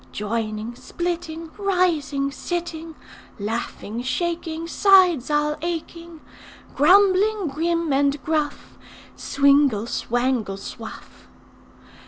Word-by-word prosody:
'Joining, 215 +1 -3
splitting, 330 +2 -5
Rising, 330 -8 +1
sitting, 330 0 -5 0.4
Laughing, 220 +1 -4
shaking, 330 +3 -3
Sides 360 -7 +4
all 300 0 +1
aching, 335 -1 -5 0.5
Grumbling, 390 +5 +4
grim, 330 +1 -1
and 280 +1 +2
gruff. 310 -2 -2 0.4
Swingle, 280 -6 +3
swangle, 240 -4 -1
swuff! 195 - -10
310 Hz, 80 wpm, -23 LUFS, 260-345 Hz, 0.5 s, Sides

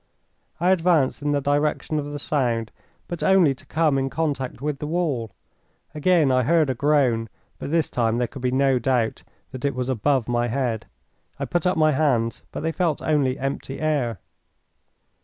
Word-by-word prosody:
I 180 +3 +3
advanced 170 -7 +2
in 145 0 0
the 145 -1 +1
direction 145 +2 0
of 145 - -4
the 145 - -4
sound, 120 -6 -1 0.4
but 175 -2 -5
only 190 -7 +4
to 130 - -15
come 155 -4 +2
in 135 0 -1
contact 140 -4 -2
with 145 0 -3
the 150 - -4
wall. 150 -9 -1 0.6
Again 155 -2 +3
I 130 0 +3
heard 155 +1 +3
a - - 0
groan, 130 -5 +1 0.3
but - - -5
this 165 0 +1
time 115 -1 0
there 125 - +1
could 135 - -10
be 125 - +1
no 135 0 +2
doubt 120 -2 0 0.3
that 130 - -8
it 140 -2 0
was 125 0 -2
above 130 0 +1
my 120 0 0
head. 120 -2 -2 0.5
I - - -3
put 175 0 0
up 180 - +1
my 155 -1 +4
hands, 130 -6 +1
but - - -5
they 160 +1 -1
felt 165 -3 -1
only 140 -4 +1
empty 135 0 -4
air. 145 -8 0
140 Hz, 185 wpm, -23 LUFS, 125-155 Hz, 0.6 s, only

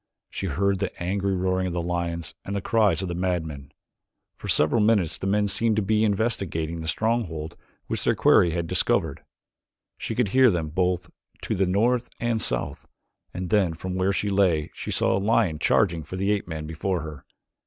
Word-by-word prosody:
She 95 - -3
heard 95 +5 0
the 100 - -1
angry 95 +2 -1
roaring 95 0 0
of 90 - -3
the 85 - -1
lions 85 -2 -3
and 100 - -4
the - - 0
cries 105 -1 +2
of - - -3
the 85 - -3
madmen. 80 -6 -3 0.6
For - - -9
several 80 +9 +3
minutes 105 -6 +2
the 95 - -3
men 105 +1 +2
seemed 110 +3 +1
to 110 - +1
be 110 +2 +2
investigating 95 -7 -1
the 80 - -6
stronghold 85 -6 -1 0.3
which - - -3
their - - +2
quarry 85 - +5
had 85 0 -2
discovered. - - 0 0.8
She 115 - -3
could 120 -4 +1
hear 130 +3 +6
them 85 -6 -1
both 90 +2 -1 0.3
to - - -1
the 95 0 +1
north 115 +6 +1
and 120 -2 0
south - - -3 0.4
and 90 -1 -5
then 95 -6 +2
from 90 +3 -5
where 95 +1 +1
she 100 +1 -1
lay 90 -6 +2
she - - -7
saw - - +2
a - - +1
lion 100 -7 +2
charging 85 0 +2
for 80 - -8
the 100 +2 0
ape 105 -3 -1
man 80 -2 -5
before 85 +4 -2
her. 75 -3 -8
95 Hz, 195 wpm, -25 LUFS, 85-105 Hz, 0.8 s, hear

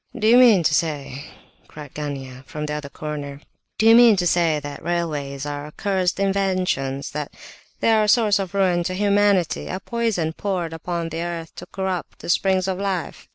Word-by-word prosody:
"Do 215 - -2
you 235 +2 +7
mean 225 -8 +6
to 150 - +2
say," 145 -3 -2 0.4
cried 150 -3 -11
Gania, 135 -3 -6
from 150 0 -5
the 150 - -3
other 150 -1 -5
corner, 145 -1 -6 0.4
"do 220 - +1
you 225 - +8
mean 235 -2 +7
to 180 -2 0
say 165 -3 +2
that 145 0 -8
railways 150 -5 -3
are 145 0 -5
accursed 185 +3 -1
inventions, 185 -9 -1
that 150 0 -5 0.5
they - - +3
are 215 -1 +4
a - - -2
source 210 -2 +4
of 195 0 -4
ruin 185 -3 +2
to 185 - -2
humanity, 200 -3 +2
a 185 - -4
poison 215 -8 -1
poured 180 -3 -3
upon 165 0 -4
the 165 +1 -4
earth 170 -1 -5
to - - -9
corrupt 190 -3 -4
the - - -9
springs 190 +1 +2
of 190 -1 -2
life?" 190 -5 -3
175 Hz, 190 wpm, -22 LUFS, 150-195 Hz, 0.5 s, you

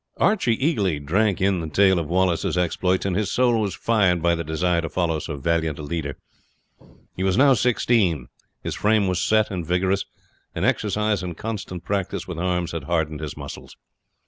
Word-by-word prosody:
Archie 185 - +2
eagerly 105 - 0
drank 95 +8 +1
in 95 -1 +2
the 80 -1 -4
tale 95 +2 +4
of 80 - -3
Wallace's 90 -1 +1
exploits, 90 +1 0
and 95 -2 0
his 105 0 0
soul 120 -3 +2
was 100 -3 -2
fired 100 -6 +2
by 85 +1 +2
the 85 0 -2
desire 85 +2 0
to 80 - -4
follow 85 -3 0
so 75 -1 -5
valiant 80 +1 0
a 75 - -7
leader. 75 -2 -4 1.0
He - - -5
was 95 +1 +1
now 135 +1 +6
sixteen, 110 - +2 0.4
his - - -3
frame 105 -1 +2
was 90 -2 0
set 110 +1 +2
and 90 -3 -3
vigorous, 95 +4 0 0.5
and - - -1
exercise 105 -1 +1
and 90 -2 -6
constant 100 -5 -5
practice 100 -2 -2
with 90 -3 -5
arms 90 -1 -1
had 80 -4 -5
hardened 80 -2 -1
his 75 -2 -6
muscles. - - -9
90 Hz, 185 wpm, -23 LUFS, 85-105 Hz, 1.0 s, now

